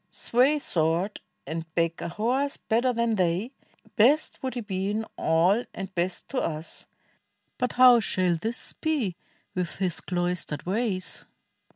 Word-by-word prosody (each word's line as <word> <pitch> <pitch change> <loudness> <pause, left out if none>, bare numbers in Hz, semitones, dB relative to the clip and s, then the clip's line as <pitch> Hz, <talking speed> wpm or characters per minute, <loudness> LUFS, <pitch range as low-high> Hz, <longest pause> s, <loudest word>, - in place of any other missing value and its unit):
Sway 260 +5 +2
sWord, 170 - 0 0.3
and 160 0 -5
back 165 -1 0
a 170 - -3
horse 250 +9 0
better 240 +3 +1
than 235 -1 +1
they, 185 +6 +1 0.4
Best 275 +8 +3
would 260 -1 -3
he 245 - -2
be 195 -2 -2
in 220 +2 -1
all 175 +8 +3
and 195 -1 -6
best 175 +1 -2
to 260 - -1
us: 155 0 -4 0.7
But 250 -1 0
how 250 -1 +8
shall 185 -4 +1
this 225 +8 -3
be. 275 - -1 0.4
with 180 -3 -2
his 185 -3 +1
cloistered 175 -4 -2
ways?" 195 -1 -1
195 Hz, 145 wpm, -27 LUFS, 175-240 Hz, 0.7 s, how